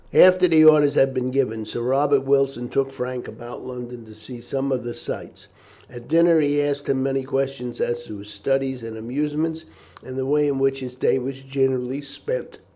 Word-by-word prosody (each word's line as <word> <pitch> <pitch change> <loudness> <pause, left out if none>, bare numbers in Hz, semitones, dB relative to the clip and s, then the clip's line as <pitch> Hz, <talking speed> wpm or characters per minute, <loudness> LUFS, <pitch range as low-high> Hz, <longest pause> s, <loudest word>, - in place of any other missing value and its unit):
After 185 0 +7
the 160 -2 +6
orders 150 -2 +6
had 135 0 +4
been 130 -1 -1
given, 125 -4 0
Sir 120 - -5
Robert 135 +2 +2
Wilson 135 -3 +1
took 135 -1 0
Frank 125 -1 -5
about 120 +1 -9
London 125 -1 -8
to 110 -1 -14
see 120 +3 -10
some 135 +3 -3
of 130 -2 -1
the 120 0 -5
sights. - - -8 0.4
At 120 -1 -11
dinner 165 +1 +5
he 145 0 +2
asked 145 0 -1
him 130 -1 +1
many 135 0 0
questions 135 -2 -3
as 120 0 -2
to 105 - -8
his 100 +1 -11
studies 130 +5 -1
and 115 -1 -7
amusements, 150 +7 -2 0.4
and 130 0 -8
the 130 - -1
way 150 +2 +2
in 140 -1 0
which 135 0 +1
his 125 -1 -7
day 130 - +2
was 135 +1 -6
generally 135 0 -1
spent. 470 - -6
135 Hz, 200 wpm, -23 LUFS, 125-140 Hz, 0.4 s, After